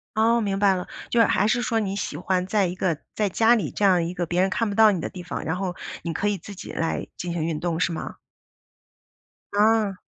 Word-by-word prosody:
噢， 230 Hz, +2 st, +3 dB
明 200 Hz, -2 st, -1 dB
白 200 Hz, -1 st, +4 dB
了。 180 Hz, -, -4 dB, 0.2 s
就 240 Hz, -, +2 dB
是 230 Hz, -, +7 dB
还 205 Hz, -, +2 dB
是 245 Hz, +3 st, +2 dB
说 235 Hz, -2 st, 0 dB
你 195 Hz, -2 st, -2 dB
喜 160 Hz, -6 st, -4 dB
欢 180 Hz, +1 st, 0 dB
在 200 Hz, 0 st, +2 dB
一 175 Hz, -, -4 dB
个 180 Hz, -4 st, 0 dB, 0.2 s
在 210 Hz, -2 st, +1 dB
家 225 Hz, +5 st, +4 dB
里 180 Hz, -11 st, -2 dB
这 205 Hz, -, 0 dB
样 180 Hz, -3 st, +4 dB
一 170 Hz, +2 st, -3 dB
个 175 Hz, -1 st, -2 dB
别 175 Hz, +2 st, 0 dB
人 190 Hz, -, +2 dB
看 230 Hz, +2 st, 0 dB
不 200 Hz, -, -3 dB
到 220 Hz, 0 st, +7 dB
你 185 Hz, -, -1 dB
的 -, -, -3 dB
地 180 Hz, -2 st, -9 dB
方， -, -, -5 dB
然 160 Hz, +3 st, -1 dB
后 185 Hz, -1 st, -3 dB, 0.3 s
你 170 Hz, -, -3 dB
可 200 Hz, +5 st, -1 dB
以 205 Hz, -1 st, 0 dB
自 200 Hz, +4 st, -10 dB
己 185 Hz, -, -8 dB
来 165 Hz, 0 st, -2 dB
进 175 Hz, -1 st, -4 dB
行 170 Hz, -2 st, -2 dB
运 160 Hz, -2 st, -2 dB
动 170 Hz, 0 st, -2 dB
是 175 Hz, -, +1 dB
吗？ 165 Hz, -, -5 dB, 1.4 s
啊。 210 Hz, -2 st, +3 dB
190 Hz, 270 characters per minute, -24 LUFS, 175-215 Hz, 1.4 s, 是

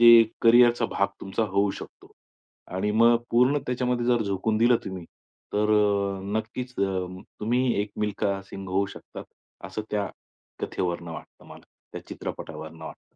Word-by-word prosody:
ते 115 Hz, -1 st, +10 dB, 0.2 s
कॅरियरचा 120 Hz, +1 st, +6 dB
भाग -, -, 0 dB
तुमचा 95 Hz, +3 st, -2 dB
होऊ 100 Hz, 0 st, +1 dB
शकतो. -, -, -10 dB, 0.6 s
आणि 95 Hz, +3 st, 0 dB
मग 115 Hz, +2 st, +6 dB
पूर्ण 125 Hz, +5 st, +4 dB
त्याच्यामध्ये 125 Hz, -1 st, 0 dB
जर 120 Hz, -2 st, +3 dB
झोकून 100 Hz, +2 st, 0 dB
दिलं 120 Hz, +2 st, +5 dB
तुम्ही, 95 Hz, -3 st, -6 dB, 0.5 s
तर 105 Hz, +1 st, +2 dB
अ, 100 Hz, -2 st, +2 dB, 0.2 s
नक्कीच 125 Hz, +3 st, -6 dB
अं, 95 Hz, -2 st, -1 dB, 0.2 s
तुम्ही 120 Hz, +3 st, +1 dB
एक 105 Hz, -, -7 dB
मिल्खा 100 Hz, -2 st, 0 dB
सिंग 95 Hz, -1 st, -7 dB
होऊ 95 Hz, +2 st, +1 dB
शकता, -, -, -10 dB, 0.4 s
असं 110 Hz, -, -5 dB
त्या 105 Hz, -1 st, 0 dB, 0.5 s
कथेवरून 85 Hz, -1 st, -2 dB
वाटतं 80 Hz, -, -10 dB
मला, -, -, -13 dB, 0.3 s
त्या -, -, -8 dB
चित्रपटावरून 80 Hz, +1 st, -7 dB
वाटतं. -, -, -11 dB
105 Hz, 145 wpm, -26 LUFS, 95-120 Hz, 0.6 s, ते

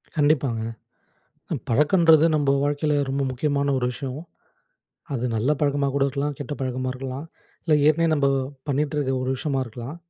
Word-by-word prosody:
கண்டிப்பாங்க. 145 Hz, -6 st, +2 dB, 0.9 s
அ -, -, 0 dB
பழக்கன்றது 160 Hz, +4 st, +5 dB
நம்ம 145 Hz, -2 st, +2 dB
வாழ்க்கையில 145 Hz, +1 st, 0 dB
ரொம்ப 140 Hz, +1 st, -1 dB
முக்கியமான 140 Hz, +2 st, 0 dB
ஒரு 125 Hz, -, 0 dB
விஷயம். 135 Hz, +3 st, -6 dB, 0.9 s
அது 125 Hz, -2 st, -2 dB
நல்ல 115 Hz, +6 st, +1 dB
பழக்கமா 140 Hz, -1 st, +1 dB
கூட 140 Hz, -, +1 dB
இருக்கலாம். 140 Hz, +1 st, -2 dB
கெட்ட 145 Hz, 0 st, -5 dB
பழக்கமா 130 Hz, 0 st, -2 dB
இருக்கலாம். 130 Hz, +2 st, -6 dB, 0.4 s
இல்ல 160 Hz, -, +1 dB
ஏற்கனவே 165 Hz, +2 st, +4 dB
நம்ம 145 Hz, -2 st, +2 dB, 0.4 s
பண்ணிகிட்டு 145 Hz, +2 st, 0 dB
இருக்க 140 Hz, -3 st, 0 dB
ஒரு 130 Hz, -, -1 dB
விஷயமா 135 Hz, 0 st, -1 dB
இருக்கலாம். 120 Hz, +5 st, -8 dB
140 Hz, 150 wpm, -24 LUFS, 130-150 Hz, 0.9 s, பழக்கன்றது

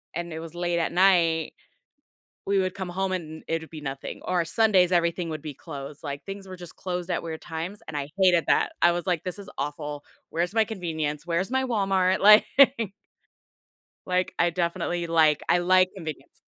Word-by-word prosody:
and 170 Hz, +1 st, -4 dB
it 160 Hz, -, -5 dB
was 165 Hz, 0 st, -9 dB
late 175 Hz, 0 st, 0 dB
at 165 Hz, -, -1 dB
night, 170 Hz, -4 st, +3 dB, 0.9 s
we 200 Hz, 0 st, +2 dB
would 185 Hz, -1 st, 0 dB
come 190 Hz, -2 st, -5 dB
home 190 Hz, +2 st, -2 dB
and 160 Hz, -3 st, -5 dB
it 165 Hz, 0 st, 0 dB
would 160 Hz, -, -12 dB
be 155 Hz, -, -8 dB
nothing, 135 Hz, -2 st, -6 dB
or 180 Hz, -2 st, +1 dB
Sundays, 190 Hz, -1 st, +3 dB
everything 170 Hz, 0 st, +1 dB
would 155 Hz, -2 st, -5 dB
be 150 Hz, -2 st, -6 dB
closed, 140 Hz, -1 st, -9 dB
like 140 Hz, -1 st, -6 dB
things 195 Hz, 0 st, -8 dB
were 185 Hz, -, -8 dB
just 175 Hz, -2 st, -10 dB
closed 180 Hz, -1 st, -4 dB
at 175 Hz, -, -1 dB
weird 160 Hz, -1 st, -6 dB
times, 170 Hz, +5 st, -5 dB
and 150 Hz, -, -5 dB
I 140 Hz, -1 st, -3 dB
hated 180 Hz, -3 st, +4 dB
that, -, -, +3 dB
I 175 Hz, -, +7 dB
was 175 Hz, +1 st, -3 dB
like, 175 Hz, -4 st, 0 dB
"This 185 Hz, +1 st, -4 dB
is 200 Hz, -1 st, -10 dB
awful. 145 Hz, 0 st, -4 dB, 0.3 s
Where's 175 Hz, +3 st, -1 dB
my 225 Hz, -1 st, +4 dB
convenience? 160 Hz, -8 st, -3 dB
Where's 175 Hz, +4 st, -1 dB
my 265 Hz, 0 st, +1 dB
Walmart?" 195 Hz, -6 st, +1 dB
Like 210 Hz, +2 st, +8 dB, 1.6 s
Like 185 Hz, 0 st, 0 dB
I 175 Hz, -, +4 dB
definitely 175 Hz, 0 st, -2 dB
like, 160 Hz, -3 st, +3 dB
I 175 Hz, -, +4 dB
like 185 Hz, +1 st, +4 dB
convenience. 160 Hz, -6 st, -8 dB
175 Hz, 190 wpm, -26 LUFS, 160-185 Hz, 1.6 s, Like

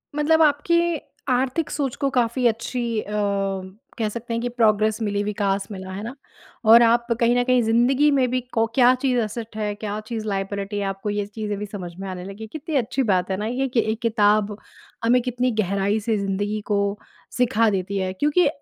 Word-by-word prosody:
मतलब 315 Hz, +2 st, +3 dB
आपकी 315 Hz, +3 st, +3 dB, 0.5 s
आर्थिक 260 Hz, +5 st, 0 dB
सोच 275 Hz, -4 st, -2 dB
को 275 Hz, -, 0 dB
काफ़ी 245 Hz, -1 st, 0 dB
अच्छी 230 Hz, 0 st, -1 dB
अ, 210 Hz, -, -9 dB, 0.9 s
कह 220 Hz, -2 st, 0 dB
सकते 235 Hz, +1 st, -6 dB
हैं 230 Hz, -, -1 dB
कि 245 Hz, -, -2 dB
प्रोग्रेस 220 Hz, -2 st, +2 dB
मिली, 205 Hz, -2 st, 0 dB
विकास 200 Hz, -1 st, -1 dB
मिला 190 Hz, -1 st, -7 dB
है 195 Hz, +2 st, -6 dB
ना। 235 Hz, +4 st, -6 dB, 0.5 s
और 230 Hz, +2 st, +8 dB
आप 235 Hz, +1 st, +3 dB
कहीं 240 Hz, +1 st, +3 dB
न 245 Hz, -, +3 dB
कहीं 250 Hz, -1 st, +3 dB
ज़िंदगी 245 Hz, +6 st, +3 dB
में 265 Hz, -2 st, +3 dB
भी 255 Hz, -, 0 dB
को 225 Hz, -1 st, +3 dB
क्या 250 Hz, -1 st, +6 dB
चीज़ 255 Hz, -1 st, 0 dB
एसेट 220 Hz, 0 st, -4 dB
है, 210 Hz, -1 st, -1 dB
क्या 210 Hz, 0 st, -4 dB
चीज़ 225 Hz, -2 st, -4 dB
लायबिलिटी 200 Hz, +1 st, -3 dB
आपको 195 Hz, +2 st, -5 dB
ये 205 Hz, 0 st, -1 dB
चीज़ें 210 Hz, 0 st, -4 dB
भी 210 Hz, -, -3 dB
समझ 195 Hz, -4 st, -7 dB
में 195 Hz, -, -5 dB
आने 180 Hz, -1 st, -6 dB
लगी। 200 Hz, +3 st, -8 dB
कितनी 310 Hz, 0 st, -5 dB
अच्छी 260 Hz, +1 st, +1 dB
बात 185 Hz, 0 st, +1 dB
है 190 Hz, -, 0 dB
ना, 210 Hz, -, -3 dB
ये 260 Hz, +4 st, -1 dB
कि 240 Hz, -2 st, 0 dB
एक 220 Hz, -, -4 dB
किताब 215 Hz, -2 st, +2 dB, 0.5 s
हमें 245 Hz, +2 st, +4 dB
कितनी 250 Hz, 0 st, -1 dB
गहराई 200 Hz, +2 st, 0 dB
से 220 Hz, 0 st, 0 dB
ज़िंदगी 205 Hz, +2 st, -2 dB
को 200 Hz, 0 st, +1 dB, 0.4 s
सिखा 230 Hz, -2 st, +3 dB
देती 195 Hz, 0 st, -2 dB
है। 185 Hz, -1 st, -1 dB
क्योंकि 295 Hz, -, +2 dB
220 Hz, 195 wpm, -23 LUFS, 205-250 Hz, 0.9 s, और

